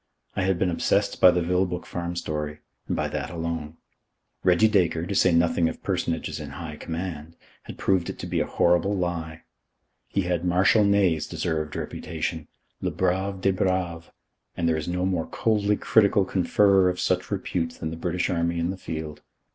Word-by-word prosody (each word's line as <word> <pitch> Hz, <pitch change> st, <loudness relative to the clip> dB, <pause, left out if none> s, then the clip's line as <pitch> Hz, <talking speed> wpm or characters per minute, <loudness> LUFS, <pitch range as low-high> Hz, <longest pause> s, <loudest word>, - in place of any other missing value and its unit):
I -, -, 0 dB
had 95 Hz, -1 st, +1 dB
been 90 Hz, 0 st, +1 dB
obsessed 85 Hz, -, 0 dB
by 90 Hz, -, +9 dB
the 90 Hz, -1 st, +2 dB
Vilboek 90 Hz, 0 st, 0 dB
Farm 85 Hz, 0 st, -4 dB
story, 75 Hz, -2 st, -4 dB, 0.3 s
and -, -, -1 dB
by -, -, 0 dB
that -, -, -3 dB
alone. 80 Hz, -2 st, -4 dB, 0.7 s
Reggie 90 Hz, +4 st, +5 dB
Dacre 90 Hz, -6 st, +2 dB
to 100 Hz, -, -3 dB
say 90 Hz, -1 st, +4 dB
nothing 85 Hz, 0 st, +3 dB
of -, -, -9 dB
personages -, -, -2 dB
in 75 Hz, -2 st, -6 dB
high 80 Hz, -3 st, -7 dB
command 85 Hz, -1 st, -5 dB, 0.3 s
had -, -, -9 dB
proved 95 Hz, -3 st, +1 dB
it -, -, -6 dB
to -, -, -6 dB
be -, -, -1 dB
a -, -, 0 dB
horrible 90 Hz, +4 st, +2 dB
lie. 80 Hz, -3 st, -3 dB, 0.6 s
He 100 Hz, -, 0 dB
had 90 Hz, -2 st, -1 dB
Marshal 90 Hz, +4 st, +4 dB
Ney's 100 Hz, -6 st, +2 dB
deserved 80 Hz, -2 st, -2 dB
reputation 80 Hz, -1 st, -4 dB, 0.3 s
le -, -, 0 dB
brave 95 Hz, +1 st, -1 dB
des 95 Hz, -, +3 dB
braves 90 Hz, -3 st, -1 dB, 0.5 s
and 85 Hz, -, 0 dB
there 80 Hz, -, +2 dB
is 80 Hz, -1 st, -3 dB
no 90 Hz, +1 st, -1 dB
more 90 Hz, -4 st, -1 dB
coldly 105 Hz, -2 st, +1 dB
critical 100 Hz, -2 st, +3 dB
conferrer 95 Hz, +1 st, +3 dB
of 90 Hz, -, -3 dB
such 90 Hz, 0 st, 0 dB
repute 90 Hz, -4 st, -2 dB
than 80 Hz, -, -5 dB
the -, -, -5 dB
British 90 Hz, +1 st, -1 dB
Army 85 Hz, -1 st, 0 dB
in 85 Hz, +2 st, 0 dB
the 95 Hz, -, -6 dB
field. 80 Hz, -4 st, -6 dB
90 Hz, 180 wpm, -25 LUFS, 80-95 Hz, 0.7 s, by